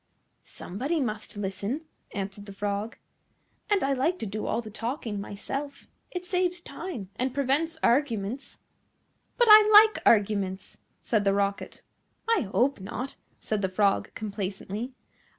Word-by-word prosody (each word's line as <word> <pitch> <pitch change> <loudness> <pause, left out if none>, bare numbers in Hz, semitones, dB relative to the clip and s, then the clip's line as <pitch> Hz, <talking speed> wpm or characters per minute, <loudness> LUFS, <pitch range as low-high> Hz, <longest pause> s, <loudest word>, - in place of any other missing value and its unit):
"Somebody 275 - -3
must 215 -5 -3
listen," 205 +7 -3 0.3
answered 200 +1 -5
the 200 - -8
Frog, 205 +2 -3 0.7
"and 410 -2 +3
I 275 0 +2
like 295 +8 +1
to - - -4
do 210 +1 -4
all - - 0
the 220 -2 -7
talking 230 -2 -4
myself. 275 +8 -6 0.2
It 360 0 -5
saves 360 -1 0
time, 330 - -7
and 255 0 -1
prevents 285 +4 +1
arguments." 240 -2 0 0.8
"But 485 - +4
I 425 0 +10
like 430 +1 +8
arguments," 200 -3 +2 0.2
said 215 -3 +1
the 195 -1 +3
Rocket. 200 0 -2 0.4
"I 430 - +2
hope 260 +2 +2
not," 245 +7 -5 0.2
said 215 -2 -2
the 190 - 0
Frog 195 +1 +1
complacently. 205 +3 -4
230 Hz, 135 wpm, -27 LUFS, 200-290 Hz, 0.8 s, I